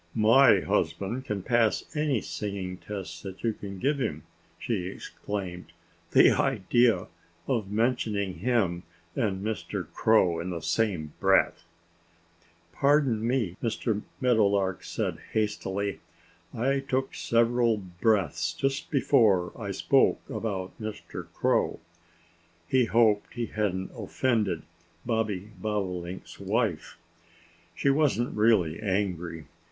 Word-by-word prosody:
"My 115 +5 +6
husband 115 +7 -1
can 100 -3 -3
pass 115 -3 +2
any 150 -7 +1
singing 95 -3 -4
test 90 -4 -7
that 95 -1 -9
you 115 -1 +1
can 100 -2 -8
give 140 +7 0
him!" 130 - -2 0.3
she 100 -7 -2
exclaimed. 90 -3 -6 0.4
"The - - +6
idea 120 -1 +2 0.4
of 115 -7 -1
mentioning 105 -3 0
him 100 -9 +1 0.3
and 100 -5 -1
Mr. 105 -3 -3
Crow 95 -7 +3
in 85 +2 -4
the 85 -2 -3
same 90 -10 0
breath!" - - +3 1.1
"Pardon 140 -6 +2
me!" 120 -8 0
Mr. 110 -2 -1 0.2
Meadowlark 100 -6 +2
said - - -3
hastily. 100 -2 -1 0.5
"I 135 +4 0
took 135 -1 -2
several 115 -1 +2
breaths 95 -2 0
just 135 0 -2
before 110 - +3
I - - -6
spoke - - +2
about 95 -4 -3
Mr. 110 -1 -6
Crow." - - +1 0.9
He 130 +2 +3
hoped 110 -2 +3
that - - -19
he 120 -1 -1
hadn't 100 -4 -2
offended 110 -10 0 0.4
Bobby 110 -4 -1
Bobolink's 95 -4 -4
wife. - - -1 0.8
She 140 - +2
wasn't 135 -4 +1
really 105 -7 +3
angry. 90 -5 -2
105 Hz, 115 wpm, -28 LUFS, 95-120 Hz, 1.1 s, My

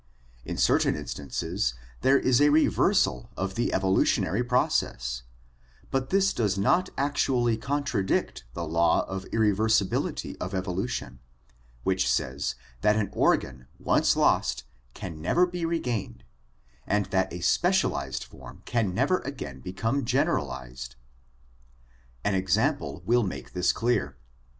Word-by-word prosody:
In - - -4
certain - - +3
instances 65 -2 -3 0.3
there 135 +1 +5
is 130 -1 +3
a 145 - +6
reversal 145 - +2
of 95 0 -2
the 120 +4 -1
evolutionary 95 +2 +2
process, - - 0 0.7
but 135 0 -1
this 195 0 +3
does 105 -4 0
not 175 - +2
actually 130 -4 +1
contradict 125 - -1
the 85 - -3
law 85 +1 +2
of 95 0 -5
irreversibility 110 -2 +1
of 95 +2 -3
evolution, 90 - -3 0.6
which 95 +3 +1
says 70 +3 -1 0.3
that 105 - +4
an 105 -3 -1
organ 65 0 +1
once - - +2
lost - - +2 0.3
can 80 -1 -7
never 170 - +3
be 175 -1 -4
regained 120 - -3 0.6
and 105 0 +1
that 95 -1 +1
a 90 - -6
specialized 85 - +1
form - - -13
can 110 -6 0
never 140 - +2
again 115 - -7
become 115 - -2
generalized. 65 - -2 1.3
An 105 - +1
example 105 - 0
will 120 +2 +3
make 95 -5 -5
this 90 0 +2
clear. 105 - -1
100 Hz, 120 wpm, -27 LUFS, 85-125 Hz, 1.3 s, a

